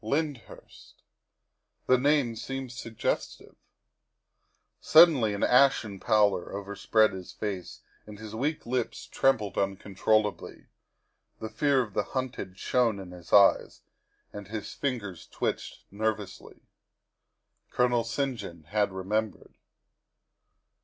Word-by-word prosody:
Lyndhurst. 140 +1 -5 0.8
The 130 -1 +4
name 140 -4 +2
seemed 135 +2 -6
suggestive. 115 -2 -4 1.3
Suddenly 150 -10 +6
an 100 - -3
ashen 125 -6 +3
pallor 105 -4 +2
overspread 100 +2 +1
his 95 -1 -8
face 100 -4 -5 0.3
and 105 -1 -10
his 110 0 -9
weak 145 +7 -2
lips 125 0 -3
trembled 110 -7 0
uncontrollably; 100 +2 -1 0.7
the 110 - -5
fear 135 +4 +2
of 105 -4 -11
the 105 - +1 0.2
hunted 125 -8 -4
shone 120 -2 +1
in 95 -2 -9
his 90 -1 -13
eyes 100 -1 +4 0.5
and 105 -1 -8
his 105 0 -6
fingers 100 - -4
twitched - - -4
nervously. 105 -1 -4 1.1
Colonel 125 -1 +1
St. 135 +2 -2
John 85 -5 -9
had 100 +5 0
remembered. 105 +3 -3
110 Hz, 105 wpm, -28 LUFS, 100-125 Hz, 1.3 s, Suddenly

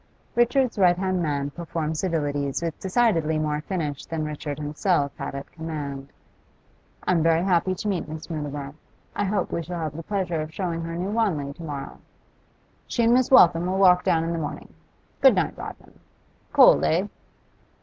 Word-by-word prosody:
Richard's 240 -1 +2
right 175 -2 +5
hand 185 -1 0
man 145 -3 -1
performed 160 -1 -4
civilities 145 -4 -1
with 165 -2 -3
decidedly 185 -7 +1
more 150 -1 -1
finish 155 -5 -3
than 160 -2 -3
Richard 150 -1 -5
himself 150 0 0
had - - -5
at 140 - -7
command. 145 -4 -6 1.0
'I - - +2
am 170 -3 +3
very 165 +1 +3
happy 185 0 +2
to 210 - -5
meet 190 -6 -1
Miss 155 0 -7
Mutimer. 145 -3 -5 0.4
I 205 - 0
hope 195 -1 -1
we 170 - -1
shall 175 +1 -6
have 155 -2 -4
the 165 - -5
pleasure 175 -3 -2
of 155 +1 -6
showing 170 -1 -3
her 165 0 -5
New 185 +4 -3
Wanley 175 -11 0
to 170 - -11
morrow.' 145 -3 -6 0.9
'She 235 - 0
and 230 +1 +5
Miss 255 0 +3
Waltham 175 -8 +6
will 185 +1 -1
walk 180 -2 +5
down 165 -1 +2
in 165 - -2
the 165 - -2
morning. 145 - -6 0.5
Good - - +7
night, - - 0
Rodman. - - -10 0.5
Cold, - - +7
eh? 180 +5 +2
165 Hz, 180 wpm, -24 LUFS, 150-185 Hz, 1.0 s, Good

